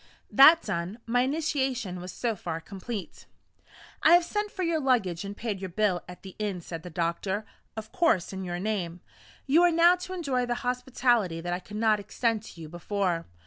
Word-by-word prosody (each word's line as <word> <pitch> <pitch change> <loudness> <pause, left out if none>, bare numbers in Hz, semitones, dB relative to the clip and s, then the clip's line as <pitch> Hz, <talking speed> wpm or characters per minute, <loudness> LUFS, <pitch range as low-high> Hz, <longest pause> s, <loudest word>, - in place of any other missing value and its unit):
That 315 +5 +8
done, 185 +1 -3
my 245 +1 +2
initiation 265 - -1
was 180 +1 -7
so 235 -3 -2
far 170 -4 -4
complete. 195 +4 -7 0.7
"I 320 - +6
have 350 0 +6
sent 415 +3 -2
for 380 -2 -4
your 335 -2 +1
luggage, 225 - +1
and 200 +1 -7
paid 210 -5 -3
your 190 - -4
bill 185 -1 +1
at 180 - -11
the 190 -1 -10
inn," 205 -4 -2
said 165 -1 -7
the 180 - -9
doctor; 175 +5 -2 0.3
"of 220 0 -7
course 330 - +2
in 190 0 -5
your 175 -1 -3
name. 180 -4 -3 0.4
You 295 +5 +4
are 350 0 +5
now 340 +2 +6
to 365 +1 -7
enjoy 270 -9 -1
the 240 - 0
hospitality 245 -7 +1
that 175 +1 -3
I 175 - -2
could 210 +3 -9
not 215 -1 +3
extend 220 +2 -1
to 170 - -12
you 160 - -7
before. 175 0 -2
210 Hz, 195 wpm, -28 LUFS, 180-260 Hz, 0.7 s, That